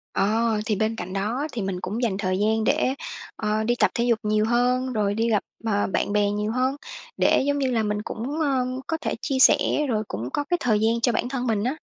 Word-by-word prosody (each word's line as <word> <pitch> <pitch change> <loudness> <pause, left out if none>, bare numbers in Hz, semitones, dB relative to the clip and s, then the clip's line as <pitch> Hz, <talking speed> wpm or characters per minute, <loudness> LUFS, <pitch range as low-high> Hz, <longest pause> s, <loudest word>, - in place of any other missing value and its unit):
Ờ, 220 +2 +1
thì 215 - 0
bên 220 +3 0
cạnh 185 -4 -6
đó 220 +9 -1
thì 235 -5 -4
mình 190 -2 -3
cũng 210 +7 -3
dành 205 -5 0
thời 185 -2 -1
gian 220 +1 +1
để, 275 +1 +2 0.4
ờ, 215 0 -1
đi 240 +2 +1
tập - - +4
thể 235 - +1
dục 235 -2 +2
nhiều 215 0 +2
hơn, 250 +2 +1
rồi 205 -3 +1
đi 225 +2 0
gặp, 210 -3 +2 0.2
ờ, 205 -2 +1
bạn 205 - -1
bè 205 -1 +3
nhiều 210 +1 -1
hơn, 255 +3 0 0.4
để - - +4
giống 285 0 +1
như 265 -2 0
là 225 -2 +1
mình 210 0 -1
cũng, 250 +8 -4
ơ, 270 -4 +1 0.2
có 325 - -1
thể - - -2
chia 280 -5 -1
sẻ - - +8 0.3
rồi 215 -3 0
cũng 115 +5 -5
có 290 - -1
cái 350 +4 0
thời 220 -4 +2
gian 225 +2 +1
cho 240 - +3
bản 240 +2 -1
thân 255 -1 -2
mình 215 -3 +1
á. 255 +5 -1
225 Hz, 245 wpm, -24 LUFS, 210-250 Hz, 0.4 s, sẻ